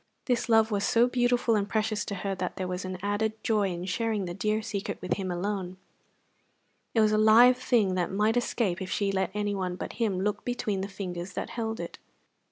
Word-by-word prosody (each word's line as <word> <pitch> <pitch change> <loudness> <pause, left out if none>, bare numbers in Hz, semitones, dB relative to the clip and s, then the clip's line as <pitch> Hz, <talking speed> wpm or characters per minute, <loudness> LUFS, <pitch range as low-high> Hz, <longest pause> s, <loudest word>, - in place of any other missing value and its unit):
This 245 -2 0
love 225 0 +4
was 200 -1 0
so 230 +3 +4
beautiful 245 -1 +2
and 200 -1 0
precious 215 0 0
to 200 - -4
her 195 +1 -3
that 185 -1 -4
there 185 - -3
was 180 +1 -4
an 185 0 -4
added 205 +2 0
joy 210 -3 +2
in 175 0 -4
sharing 210 +1 -1
the 175 - -4
dear 215 +3 -1
secret 205 -2 -4
with 180 - -1
him 190 -2 -3
alone; 185 0 -3 1.2
it 225 - +5
was 215 0 +4
a 215 - +3
live 235 +4 +7
thing 235 -7 +2
that 180 -2 -1
might 210 +3 +2
escape 230 -6 0
if 185 - -4
she 200 0 0
let 190 -1 0
anyone 200 -3 -1
but - - -6
him 210 -6 0
look 205 +1 -1
between 215 -5 -2
the 195 - -3
fingers 180 -2 -6
that - - -4
held 225 -1 -3
it. - - -6
205 Hz, 210 wpm, -28 LUFS, 185-225 Hz, 1.2 s, live